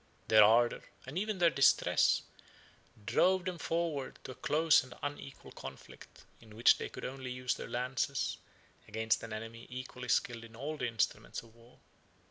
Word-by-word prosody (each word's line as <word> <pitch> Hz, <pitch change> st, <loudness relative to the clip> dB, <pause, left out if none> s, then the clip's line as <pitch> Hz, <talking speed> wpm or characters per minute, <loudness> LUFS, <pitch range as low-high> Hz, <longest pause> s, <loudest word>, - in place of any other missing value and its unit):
Their 110 Hz, -1 st, +8 dB
ardor, 120 Hz, +3 st, +4 dB, 0.2 s
and 130 Hz, +4 st, -8 dB
even 210 Hz, +2 st, -1 dB
their 170 Hz, -2 st, +4 dB
distress, 140 Hz, -, +4 dB, 0.8 s
drove 185 Hz, -, +3 dB
them 180 Hz, -2 st, -3 dB
forwards 165 Hz, -6 st, -2 dB
to -, -, -7 dB
a -, -, -7 dB
close 155 Hz, +4 st, +3 dB
and 130 Hz, -1 st, -12 dB
unequal 145 Hz, -1 st, -6 dB
conflict, -, -, -11 dB, 0.2 s
in 110 Hz, -2 st, -15 dB
which 115 Hz, -, +5 dB
they -, -, -4 dB
could -, -, -8 dB
only 130 Hz, 0 st, -5 dB
use 125 Hz, 0 st, -1 dB
their -, -, -7 dB
lances 125 Hz, +1 st, -1 dB, 0.5 s
against 110 Hz, +1 st, 0 dB
an 115 Hz, -, -8 dB
enemy 115 Hz, +2 st, -7 dB
equally 125 Hz, 0 st, -7 dB
skilled 120 Hz, -1 st, +1 dB
in 115 Hz, -1 st, -13 dB
all 145 Hz, +6 st, -4 dB
the 125 Hz, -5 st, -2 dB
instruments 115 Hz, 0 st, -2 dB
of 115 Hz, -1 st, -18 dB
war. 115 Hz, +2 st, -20 dB
125 Hz, 165 wpm, -33 LUFS, 115-150 Hz, 0.8 s, Their